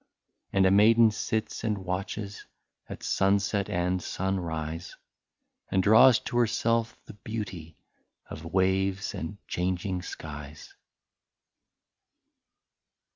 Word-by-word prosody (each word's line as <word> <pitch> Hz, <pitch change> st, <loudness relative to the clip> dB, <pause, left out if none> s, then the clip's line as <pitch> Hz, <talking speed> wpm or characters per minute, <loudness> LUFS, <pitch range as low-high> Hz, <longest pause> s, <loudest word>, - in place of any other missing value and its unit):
And 95 Hz, -1 st, +3 dB
a 95 Hz, -, +5 dB
maiden 110 Hz, +3 st, +6 dB
sits 110 Hz, +1 st, -3 dB
and 110 Hz, -2 st, 0 dB
watches 100 Hz, +2 st, -5 dB, 0.4 s
At -, -, -8 dB
sunset 100 Hz, +1 st, +1 dB
and 90 Hz, +1 st, 0 dB
sunrise, 85 Hz, -3 st, -3 dB, 0.7 s
And 95 Hz, -, +2 dB
draws 115 Hz, +4 st, +7 dB
to 120 Hz, -, -3 dB
herself 115 Hz, 0 st, +1 dB
the -, -, -11 dB
beauty 95 Hz, -7 st, -7 dB, 0.5 s
Of 80 Hz, -, -8 dB
waves 95 Hz, +1 st, +1 dB
and 80 Hz, +5 st, -5 dB
changing 90 Hz, +1 st, -2 dB
skies. 75 Hz, -4 st, -9 dB
95 Hz, 95 wpm, -28 LUFS, 90-105 Hz, 0.7 s, draws